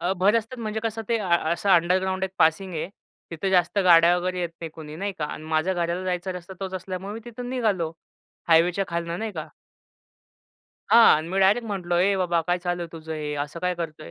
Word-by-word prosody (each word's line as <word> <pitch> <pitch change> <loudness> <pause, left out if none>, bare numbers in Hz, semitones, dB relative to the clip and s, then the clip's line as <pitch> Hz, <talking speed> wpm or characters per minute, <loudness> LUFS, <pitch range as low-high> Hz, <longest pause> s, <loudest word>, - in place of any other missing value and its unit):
अ, 180 +2 0
भर 195 +3 +4
रस्त्यात 230 +2 -4
म्हणजे 215 0 -3
कसं, 225 0 -2
ते 230 - +2
अ 200 -4 -4 0.2
असं 185 +4 -2
अंडरग्राउंड 185 +2 +2
एक 190 - -4
पासिंग 160 +4 +2
आहे. 160 - -3 0.4
तिथे 180 +4 -2
जास्त 180 +1 +2
गाड्या 170 0 +6
वगैरे 180 0 -2
येत 175 - -1
नाही, 165 -1 -5
कुणी 155 -1 -9
नाही 200 +3 -3
का. 150 - -1
आणि 155 - -7
माझ्या 160 +4 0
घराला 175 +1 -1
जायचा 180 0 -2
रस्ता 180 +1 -9
तोच 190 -1 -4
असल्यामुळे 185 +2 -5
मी 225 - -6
तिथून 245 +1 -7
निघालो, 205 -10 0 0.6
हायवेच्या 170 +4 +4
खालनं, 170 0 -3
नाही 220 -1 -4
का. 155 -3 -6 1.4
हां 235 - +8
आणि 155 +2 -4
मी 190 +2 -2
डायरेक्ट 210 +5 +3
म्हटलो, 180 -4 -2
"ए 195 +2 +3
बाबा, 175 -3 +1
काय 175 0 +2
चालू 175 0 -2
आहे 170 - -6
तुझं 160 -1 -7
हे? 150 -1 -4
असं 155 +3 -10
काय 180 0 0
करतोय?" 160 - -6
180 Hz, 215 wpm, -25 LUFS, 170-195 Hz, 1.4 s, हां